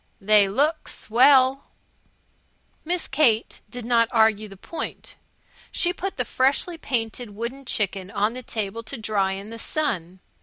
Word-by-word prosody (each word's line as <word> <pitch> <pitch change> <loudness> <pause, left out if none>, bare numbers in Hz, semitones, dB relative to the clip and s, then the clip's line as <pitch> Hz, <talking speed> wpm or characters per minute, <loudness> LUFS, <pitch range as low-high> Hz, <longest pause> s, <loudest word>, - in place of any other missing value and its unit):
"They 205 0 +4
look 295 +9 0
swell." 260 +3 +4 1.2
Miss 350 +2 -1
Kate 255 -6 +2
did 245 +1 -7
not 230 -1 +3
argue 220 -2 +3
the 195 -1 -13
point. 330 - -7 0.6
She 350 -1 +1
put 385 +2 -5
the 250 - -1
freshly 275 +9 +1
painted 230 -5 -3
wooden 245 +5 -5
chicken 195 -4 -1
on 210 +2 0
the 255 - -6
table 220 -2 -4
to 230 +4 -7
dry 205 -3 0
in 200 +3 -7
the 230 - -8
sun. 190 - -2
230 Hz, 145 wpm, -24 LUFS, 210-270 Hz, 1.2 s, They